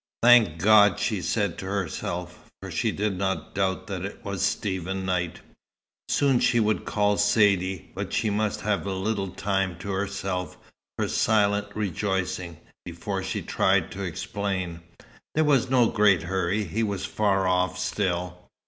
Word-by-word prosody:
"Thank 115 -9 +6
God!" 105 +2 +6
she 105 -5 -1
said 100 +2 -1
to 95 - -6
herself. 90 -2 -4
For - - -8
she - - 0
did 100 -2 -2
not 95 -1 -2
doubt 95 -1 -1
that 95 -2 -5
it 100 +4 -7
was 100 -3 -3
Stephen 95 -1 -1
Knight. 90 -2 -2 0.7
Soon 135 -3 +3
she 120 -1 +3
would 110 -1 +1
call 105 -1 +1
Saidee; 100 -3 +2
but - - -5
she 110 - 0
must 105 +1 -1
have 100 -3 -1
a 95 - -1
little 100 +1 -1
time 95 -1 -1
to 100 +3 -5
herself, 95 -1 -3 0.4
for - - 0
silent 105 -2 +2
rejoicing, 95 -3 -2 0.3
before 95 +3 -4
she 95 - -3
tried 95 -3 +1
to 100 - -6
explain. 95 -1 -3 0.6
There 155 - +4
was 140 -5 +3
no 125 -2 +4
great 105 -6 +3
hurry. 95 +3 0
He 100 +5 -2
was 100 -3 -2
far 95 -2 +1
off, 90 0 +1
still. 90 -2 -2
95 Hz, 155 wpm, -26 LUFS, 90-105 Hz, 0.7 s, Thank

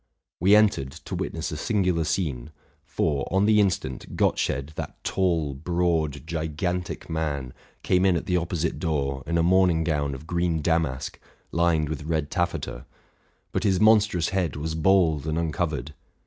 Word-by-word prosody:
We 95 +4 +6
entered, 105 -11 +3
to 85 +4 -9
witness 85 -3 -3
a 75 - -4
singular 90 -4 +1
scene: 75 -7 -2 0.3
for, 70 -4 -1
on 95 +2 +2
the 105 0 +5
instant, 90 -10 -1
Gottsched, 70 +3 0
that - - -6
tall, 85 -6 0
broad, 80 -1 -1
gigantic 85 +2 -3
man, 75 -5 -3 0.3
came 90 0 +2
in 95 -2 +4
at 85 - -2
the 90 - 0
opposite 85 -2 -1
door 70 -5 -1
in 85 - +1
a 85 - +3
morning 90 -2 +4
gown 75 -4 -1
of 65 - -10
green 85 -2 0
damask 80 -6 -1 0.3
lined 85 -2 +2
with 75 0 -5
red 80 -2 -1
taffeta; 85 -8 -2 0.6
but - - -1
his 95 -3 +2
monstrous 105 -5 +4
head 90 -7 -1
was 80 +2 -3
bald 80 -3 +3
and 80 +1 -1
uncovered. 80 -2 -2
80 Hz, 155 wpm, -25 LUFS, 75-90 Hz, 0.6 s, We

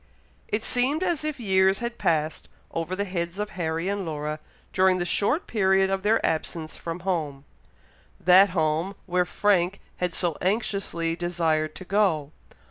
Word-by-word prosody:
It 215 +1 -1
seemed 270 +9 +1
as 345 -5 0
if 305 -3 -3
years 190 -3 +3
had 235 0 -5
passed 155 -1 0 0.2
over 165 +3 -3
the 200 - -1
heads 175 -1 -3
of 210 0 -3
Harry 165 0 -2
and 200 0 -1
Laura 150 -2 -4 0.3
during 185 0 +4
the 175 - -1
short 210 - +1
period 190 -3 +2
of 195 0 0
their 215 +3 +2
absence 160 0 -2
from 165 +1 -6
home 155 -7 -2 0.7
that 185 +3 +6
home 165 +2 0
where 180 -1 +1
Frank 195 -1 +1 0.2
had 180 -1 -2
so 170 -4 0
anxiously 190 -5 -1
desired 165 -3 0
to 185 - -9
go! 180 -8 +1
185 Hz, 155 wpm, -26 LUFS, 165-200 Hz, 0.7 s, that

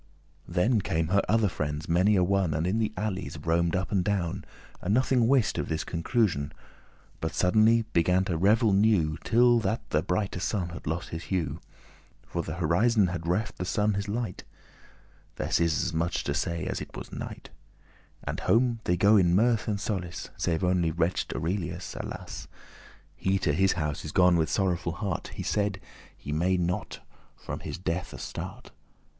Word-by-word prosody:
Then 100 +6 +2
came 80 -2 -1
her 100 +2 +4
other 110 -1 +4
friends 75 -3 -3
many 90 +5 +3
a 90 - +4
one, 95 -4 +1
And 80 +2 0
in 100 +5 +1
the 110 -2 0
alleys 95 -2 -3
roamed 85 +1 +1
up 95 +1 -2
and 95 -3 +2
down, 95 -4 -1 0.4
And 100 +4 +1
nothing 125 -2 +3
wist 130 -3 +2
of - - -3
this 80 0 -1
conclusion, 85 - 0 0.7
But 80 - -3
suddenly 110 +5 +4
began 90 +2 +3
to 90 - -1
revel 105 +5 +4
new, 95 -7 +3
Till 120 0 +5
that 110 0 -2
the - - +3
brighte 90 -1 -2
sun 95 -3 -1
had 85 -2 -9
lost 80 +3 -2
his 80 +1 -6
hue, 90 -5 -2 0.7
For 85 - -3
th' 80 - -5
horizon 95 +5 +3
had 85 -1 -4
reft 100 +6 -1
the - - -1
sun 105 +3 +1
his 100 +1 -2
light 110 -2 -3 0.9
(This - - 0
is 85 -1 +2
as - - -2
much 85 +2 -1
to 70 - -1
say 85 +2 -2
as - - -3
it - - -8
was - - -8
night); - - -7 0.7
And - - -3
home 120 0 +2
they 90 - +2
go 100 +3 +5
in 90 -2 +4
mirth 115 +2 +2
and 105 - +1
in - - -3
solace; 95 -4 -4
Save 85 +1 -1
only 90 -2 +2
wretch'd 85 +3 -1
Aurelius, 90 +1 -3
alas - - -7 0.7
He 95 +1 +1
to 80 -5 0
his 95 +5 +3
house 75 -4 -3
is 75 - -5
gone 90 0 +5
with 80 -2 +1
sorrowful 90 -4 0
heart. 90 +1 -3
He - - -4
said, 100 -2 0 0.4
he 75 - -7
may 90 +5 +2
not 90 0 -2 0.3
from - - -6
his - - -6
death 90 0 -3
astart. - - -7
90 Hz, 180 wpm, -28 LUFS, 85-105 Hz, 0.9 s, Till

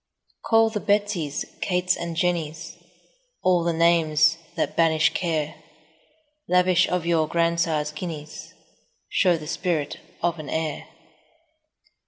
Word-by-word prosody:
Call 225 0 +3
the 215 - -2
Betsies, 200 -8 0 0.2
Kates, 180 0 +1
and 170 -1 -5
Jennies, 165 -1 -2 0.7
All 180 -2 +3
the 170 - +1
names 165 -1 +3 0.2
that 165 - -2
banish 160 -1 +3
care; 160 -4 -1
10 - - -23 0.9
Lavish 180 0 +3
of 180 -2 -1
your 165 -2 +2
grandsire's 165 -2 0
guineas, 150 -1 -7 0.6
Show 180 -3 +3
the 155 - -9
spirit 155 -2 -2 0.2
of 170 -1 0
an 150 - -7
heir. 160 -2 -3
170 Hz, 120 wpm, -24 LUFS, 155-180 Hz, 0.9 s, Call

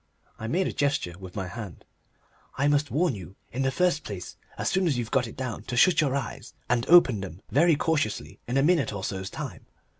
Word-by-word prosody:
I 110 - -4
made 180 +10 +1
a - - -2
gesture 140 -11 0
with 95 -1 -10
my 95 -2 -3
hand. 100 -3 -8 0.7
"I 140 +2 +2
must 145 0 +2
warn 165 0 +1
you 95 -2 -9 0.2
in 130 - -3
the 135 - +2
first 155 +1 +1
place 95 -4 -7 0.2
as - - -2
soon 190 -1 +2
as 140 -6 +1
you've 120 -2 -3
got 125 -2 +2
it - - -10
down 130 -4 -4
to 125 - -3
shut 175 +5 +6
your 140 -3 +1
eyes, 135 -5 -5
and 120 +1 +1
open 160 - +7
them 95 -1 -8
very 160 +4 +5
cautiously 140 - -1
in 125 +3 0
a 135 - +4
minute 155 -6 +3
or 100 -2 -5
so's 95 -1 -3
time. 130 - -7
130 Hz, 220 wpm, -27 LUFS, 100-150 Hz, 0.7 s, open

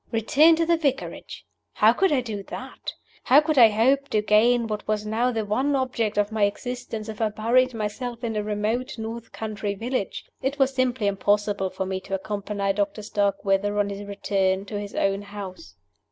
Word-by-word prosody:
Return 295 +8 +5
to 330 +1 +1
the 335 0 +3
Vicarage! 280 -4 -3 0.3
How - - +5
could 385 -3 +2
I 275 -3 +3
do 215 -4 -5
that? - - -7 0.3
How 270 - +7
could 300 -2 +2
I 230 -2 +9
hope 265 +6 +2
to 210 -1 +1
gain 230 +3 +4
what 215 -2 -4
was 215 0 -1
now 230 +4 +1
the 220 -3 -2
one 260 +8 +1
object 235 -5 -1
of 205 +1 +1
my 215 -2 +2
existence 225 0 -4
if 220 0 -7
I 220 - +2
buried 240 +4 +2
myself 230 +3 -4
in 225 -2 -2
a 210 - 0
remote 215 +4 -2
north 225 +1 -6
country 215 -2 -4
village? 235 0 -3 0.2
It 270 +2 -1
was 270 -1 +2
simply 255 -3 0
impossible 205 0 +1
for 190 - -4
me 190 0 -3
to 195 +1 -4
accompany 200 0 -2
Doctor 205 +1 -2
Starkweather 200 0 0
on 205 -1 +1
his 200 0 -6
return 195 -1 0
to 205 0 -4
his 205 -1 -7
own 195 0 +1
house. 205 - -9
215 Hz, 190 wpm, -25 LUFS, 205-250 Hz, 0.3 s, I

